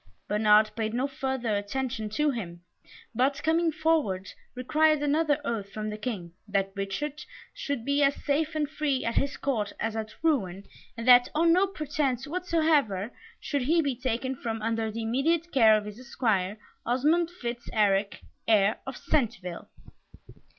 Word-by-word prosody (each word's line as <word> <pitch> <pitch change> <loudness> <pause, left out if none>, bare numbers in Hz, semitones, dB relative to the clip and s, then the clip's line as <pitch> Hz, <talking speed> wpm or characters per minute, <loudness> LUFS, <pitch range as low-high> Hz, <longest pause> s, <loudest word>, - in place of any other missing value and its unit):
Bernard 210 +1 +4
paid 220 0 -2
no 255 +2 +1
further 265 -5 -2
attention 220 +1 -3
to 295 +7 +1
him, 175 -9 -6 0.5
but, 270 +4 +1
coming 325 +1 +2
forward, 310 - 0 0.3
required 305 +4 +2
another 295 0 +2
oath 205 -4 -3
from 215 0 -4
the 210 - -5
King, 200 -7 -5
that 195 -1 0
Richard 205 +10 -4 0.3
should 280 -5 -4
be 280 +1 +1
as 280 0 +4
safe 310 +2 -1
and 300 -1 0
free 290 -3 -1
at 230 - 0
his 280 +3 0
court 225 -7 -1
as 225 0 -2
at 220 0 -5
Rouen, 200 - 0 0.3
and 230 +1 -5
that 245 -1 +7
on 330 +2 +4
no 375 +3 +4
pretence 290 -7 -2
whatsoever 305 - +1 0.3
should 285 -2 -2
he 315 +7 +2
be 280 -5 0
taken 255 +1 -2
from 225 -2 -4
under 225 0 -1
the 225 +1 -5
immediate 315 +9 0
care 220 -5 +6
of 210 - -4
his 210 +2 -8
Esquire, 220 -7 -1 0.3
Osmond 300 +8 +2
Fitz 240 -8 -6
Eric, 200 -2 +1 0.3
heir 215 -1 +3
of 265 - -5
Centeville. 215 - -2
250 Hz, 155 wpm, -27 LUFS, 215-295 Hz, 0.5 s, that